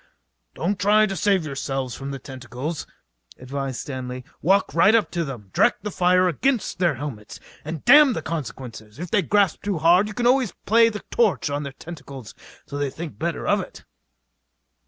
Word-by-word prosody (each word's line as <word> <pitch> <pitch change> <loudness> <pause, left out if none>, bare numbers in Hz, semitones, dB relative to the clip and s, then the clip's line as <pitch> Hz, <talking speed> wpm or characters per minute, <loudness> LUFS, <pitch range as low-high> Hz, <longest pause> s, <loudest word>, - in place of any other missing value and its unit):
"Don't 190 +3 -1
try 210 +2 +4
to 195 -2 -3
save 190 -2 +1
yourselves 135 -3 -3
from 135 +3 -6
their 140 - -4
tentacles," 130 +4 -6 0.5
advised 135 0 -4
Stanley. 125 -2 -6 0.2
"Walk 195 +5 +2
right 195 +7 +5
up 225 - +2
to 170 -1 -1
them, 120 -10 -8
direct - - +2
the 210 - -3
fire 180 0 +3
against 235 - 0
their 175 -5 +2
helmets, 120 -6 -7 0.2
and 155 0 -6
damn 285 0 +8
the 160 - -4
consequences. 125 -8 -6
If 175 +2 -7
they 205 - +3
grip 200 -3 +2
too 205 -3 -2
hard 175 +6 +4
you 210 - -8
can 240 - -1
always 250 -5 +3
play 230 +2 +5
the 210 -2 -7
torch 215 -9 +1
on 145 +1 -1
their 140 -2 -6
tentacles 140 -7 -10 0.3
till 145 - -6
they 145 -1 0
think 160 +3 -8
better 165 +1 -3
of - - +3
it." - - -11
165 Hz, 180 wpm, -23 LUFS, 135-200 Hz, 0.5 s, damn